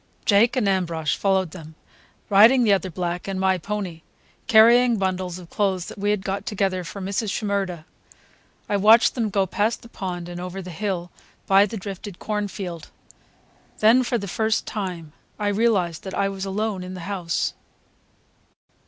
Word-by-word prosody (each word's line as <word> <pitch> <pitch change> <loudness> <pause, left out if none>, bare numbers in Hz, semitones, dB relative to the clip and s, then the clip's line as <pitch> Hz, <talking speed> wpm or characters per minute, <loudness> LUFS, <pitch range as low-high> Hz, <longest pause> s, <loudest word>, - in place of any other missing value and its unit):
Jake 225 +4 +4
and 245 -6 +1
Ambrosch 170 -5 0
followed 190 -4 +1
them, 160 -3 -11 0.5
riding 225 +6 +6
the 210 -3 +4
other 190 -1 0
black 175 +1 -4
and 195 -1 -3
my 190 -1 +2
pony, 190 -3 -4 0.5
carrying 235 +1 +6
bundles 185 -2 -2
of 175 -2 -13
clothes 190 -3 0
that - - -9
we 205 +1 0
had 210 -2 0
got 195 +1 -3
together 190 -3 -1
for 185 +4 -8
Mrs. 200 +3 -2
Shimerda. 195 -5 -2 0.8
I 205 - +1
watched 220 +4 +6
them 230 -4 -1
go 195 -1 +1
past 210 +4 -1
the 235 - -13
pond 180 -5 -5
and 175 0 -7
over 180 +1 -6
the 185 -1 -7
hill 180 -1 -3 0.3
by 195 +1 +5
the 220 - -6
drifted 195 -1 -7
cornfield. 200 -5 -4 0.9
Then, 225 +4 +5
for 245 -1 0
the 200 -2 -5
first 220 +4 0
time, 180 -7 -5 0.2
I 205 -1 0
realized 200 -6 +1
that 190 - -6
I 200 0 +1
was 195 0 -5
alone 200 -1 -2
in 185 +1 -7
the 185 - -7
house. 180 -3 -2
195 Hz, 170 wpm, -23 LUFS, 180-210 Hz, 0.9 s, riding